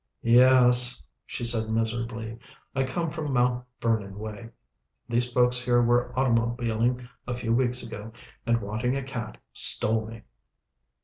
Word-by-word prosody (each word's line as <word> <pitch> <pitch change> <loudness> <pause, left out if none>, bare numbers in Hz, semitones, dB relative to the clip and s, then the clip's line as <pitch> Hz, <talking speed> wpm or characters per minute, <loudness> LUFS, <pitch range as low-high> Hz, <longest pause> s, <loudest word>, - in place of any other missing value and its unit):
"Yes," 125 0 +4 0.2
she - - -6
said 115 -2 0
miserably. 115 0 -4 0.3
"I 135 -1 -1
come 165 +5 -4
from 150 -3 -5
Mount 125 0 0
Vernon 105 -4 -2
way. 110 +1 -9 0.6
These 120 +1 -1
folks 125 0 +2
here 120 0 +1
were 120 +1 0
automobiling 120 0 -1 0.2
a 125 - -3
few 115 -2 -3
weeks 125 0 +2
ago, 110 -1 -9 0.3
and 115 -2 -1
wanting 115 +6 -3
a 140 - -4
cat, 120 -4 -7 0.2
stole 110 0 +6
me." 115 -1 -12
120 Hz, 135 wpm, -25 LUFS, 115-125 Hz, 0.6 s, stole